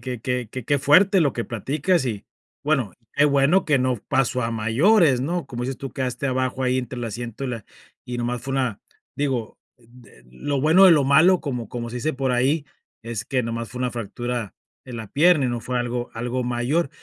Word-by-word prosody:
que 125 -3 -5
que 125 -1 -2
que 130 0 -7
que 145 +3 +1
fuerte 185 +8 +5
lo 145 -5 +2
que 115 - -3
platicas 140 - 0
y 105 -4 -4 0.4
bueno, 135 - 0 0.2
qué 145 - +3
bueno 145 +6 +3
que 145 -3 +3
no 130 -1 +1
pasó 125 -1 +1
a 115 - -2
mayores, 130 - +3
¿no?, 170 +6 -2
como 120 -1 -4
dices 130 +1 -3
tú, 135 - -6
quedaste 130 +1 -3
abajo 130 0 -1
ahí 130 0 +1
entre 125 0 -5
el 120 - -3
asiento 115 +3 -6
y 135 - -2
la 115 -4 -5 0.4
y 125 0 -5
nomás 120 0 -2
fue 135 +3 -5
una 130 -6 -1 0.4
digo, 130 -6 -2 0.2
d 120 - -19
lo 135 - -2
bueno 165 +6 +6
de 180 - +9
lo 150 - +4
malo, 155 +7 +5
como 125 -7 -4
como 120 -1 -5
se 125 - -6
dice 140 +6 -1
por 135 -1 -1
ahí, 135 +5 +1 0.4
es 115 -1 -5
que 130 -1 -1
nomás 115 0 -4
fue 125 - -8
una 125 - 0
fractura 120 -1 -4 0.3
en 125 - -7
la 110 -2 -7
pierna 155 - +4
y - - 0
no 120 - -2
fue 125 +3 -4
algo 120 0 -2
algo 120 +2 -2
mayor. 125 +7 0
125 Hz, 215 wpm, -23 LUFS, 120-140 Hz, 0.4 s, de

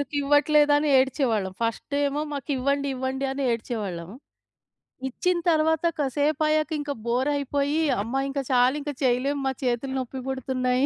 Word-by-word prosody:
మాకెందుకివ్వట్లేదని 290 +1 +3
ఏడ్చేవాళ్ళం. 235 -8 +1
ఫస్టేమో 280 +5 -1
మాకివ్వండి, 280 0 -1
ఇవ్వండి 265 +1 -2
అని 275 +1 -3
ఏడ్చేవాళ్ళం. 200 -7 -4 1.0
ఇచ్చిన 360 +7 0
తర్వాత 320 +1 +2
కసేపయ్యాక 305 +2 +1
ఇంక 290 0 -3
బోరయిపోయి, 280 +4 0 0.2
అమ్మా! 235 +6 -2
ఇంక 275 +1 -2
చాలింక 260 +4 +2
చెయలేం 260 +3 +1
మా, 265 - +2
ఇంక - - -20
చేతులు 250 +2 -1
నొప్పి 260 +1 -5
బుడుతున్నాయి 260 0 0
275 Hz, 115 wpm, -25 LUFS, 250-290 Hz, 1.0 s, మాకెందుకివ్వట్లేదని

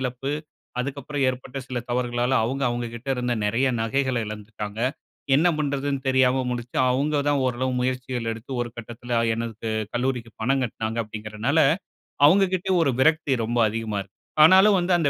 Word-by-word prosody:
இழப்பு, 130 +2 -3 0.5
அதுக்கப்புறம் 140 +1 -3
ஏற்பட்ட 130 0 -5
சில 125 -2 -3
தவறுகளால, 120 +1 0
அவுங்க, 135 +4 -2
அவுங்ககிட்ட 120 +1 -5
இருந்த 125 -1 0
நெறய 115 +6 +2
நகைகள 130 +2 0
எழந்துட்டாங்க. 105 0 -6 0.5
என்ன 160 +6 +5
பண்றதுனு 140 -1 -1
தெரியாம 130 0 +3
முழிச்சு, 120 0 -5
அவுங்க 145 +3 +1
தான் 145 - +2
ஓரளவு 130 +1 -1
முயற்சிகள் 125 -2 -2
எடுத்து, 115 +4 -10
ஒரு 120 - -5
கட்டத்தில, 120 +1 -3
எனக்கு 115 -1 -4 0.3
கல்லூரிக்கு 120 -2 -1
பணம் 135 +3 +2
கட்டுனாங்க 110 -1 -4
அப்படிங்கறனால, 110 +6 -2 0.7
அவுங்ககிட்டயும் 185 +2 +3
ஒரு 140 - +2
விரக்தி 155 0 +3
ரொம்ப 120 +2 -1
அதிகமா 110 -1 -3
இருக்கு. 95 -1 -14 0.3
ஆனாலும் 190 +5 +7
வந்து, 175 +1 +1
அந்த 150 -4 +2
125 Hz, 145 wpm, -24 LUFS, 115-140 Hz, 0.7 s, ஆனாலும்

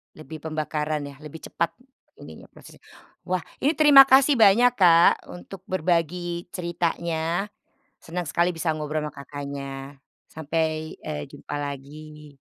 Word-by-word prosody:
Lebih 155 0 -10
pembakaran 155 -1 -3
ya, 140 -1 -9
lebih 155 +1 -11
cepat 170 - -2 0.5
ininya, - - -12
prosesnya. - - -17 0.5
Wah, 185 0 0 0.2
ini 290 +4 +2
terima 285 -3 +8
kasih 270 -1 +5
banyak, 225 +4 +6
Kak, 170 -3 +5
untuk 180 +1 -10
berbagi 175 0 -1
ceritanya. 170 +1 -2 0.5
Senang 175 +2 -5
sekali 170 +2 +1
bisa 165 0 -1
ngobrol 150 0 -3
sama - - -7
Kakaknya. 140 0 -7 0.3
Sampai, 160 0 -3
eee, 150 -1 -5
jumpa 145 0 -9
lagi. 145 +1 -9
160 Hz, 125 wpm, -24 LUFS, 150-175 Hz, 0.5 s, terima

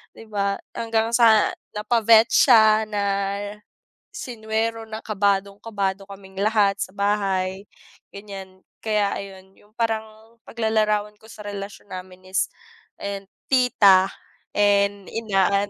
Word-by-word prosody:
'di - - -12
ba. 200 -1 0 0.2
Hanggang 225 -1 0
sa 225 -3 +5 0.2
napa-vet 225 +1 +4
siya, 220 -6 +6
na 205 -1 -1 1.1
sinuwero, 225 -1 -3
na 220 0 -6
kabadong-kabado 200 -1 -1
kaming 190 -1 -12
lahat 205 -2 +2
sa - - -3
bahay 195 -1 -1 0.5
ganiyan. 195 -2 -10 0.2
Kaya 210 -2 +1
ayun, 190 -1 -10
'yung 210 +1 -25
parang 220 0 -4
paglalarawan 215 -2 0
ko - - -20
sa - - -11
relasyon 200 0 -8
namin 185 0 -10
is 190 - 0 0.5
ayan 200 -1 -5 0.3
tita 200 -7 +5 0.5
and 200 -1 +2
inaan 200 -2 +1
205 Hz, 110 wpm, -23 LUFS, 195-220 Hz, 1.1 s, siya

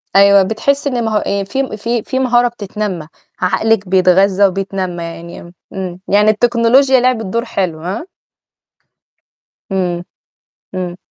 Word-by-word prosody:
أيوه، 200 0 +6
بتحِس 275 +8 0
إن 245 -4 -1
مه 215 -1 +1
آآ 200 -1 -1
في 265 +8 -2
م 260 - -5
في 230 +1 -2
في 260 - -2
مهارة 245 -2 +3
بتتنمّى، 205 -7 -5 0.3
عقلِك 205 +2 +1
بيتغذّى 190 +1 +4
وبيتنمّى 185 -2 -3
يعني 170 +1 -9 0.2
إمم. 185 -2 -5
يعني 210 +2 +4
التكنولوجيا 240 +4 +3
لعبت 245 -3 +1
دور 230 +5 -2
حلو، 180 -8 -2
ها؟ 190 - -5 1.6
إمم. 180 -2 -1 0.7
إمم. 180 -1 -4
200 Hz, 130 wpm, -16 LUFS, 185-235 Hz, 1.6 s, أيوه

